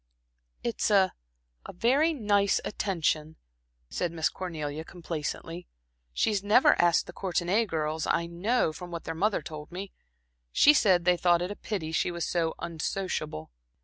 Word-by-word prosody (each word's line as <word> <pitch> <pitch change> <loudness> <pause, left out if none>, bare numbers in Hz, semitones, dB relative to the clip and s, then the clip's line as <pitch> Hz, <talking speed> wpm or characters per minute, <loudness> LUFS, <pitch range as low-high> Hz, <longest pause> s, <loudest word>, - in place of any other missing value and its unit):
"It's 235 -1 -1
a 195 -3 +4 0.5
a - - -9
very 270 - +3
nice 205 -8 +2
attention," 160 -6 -1 0.5
said 175 - -2
Miss 160 -2 0
Cornelia, 155 -4 -5
complacently. 165 0 -6 0.4
"She's 200 - 0
never 210 +5 +5
asked 175 -1 +3
the - - -10
Courtenay 190 +4 0
girls, 155 -2 -2
I 170 - +1
know, 175 +2 0
from 180 +2 -8
what 170 -1 -6
their 165 - -4
mother 195 0 0
told 150 +1 -8
me. 190 +2 -6 0.6
She 295 - +6
said 185 - +3
they 180 -1 +4
thought 175 0 +3
it 180 - -3
a - - -5
pity 185 -9 -4
she 165 - +1
was 170 -1 -3
so 165 -2 0
unsociable. 160 - -4
175 Hz, 150 wpm, -28 LUFS, 160-200 Hz, 0.6 s, She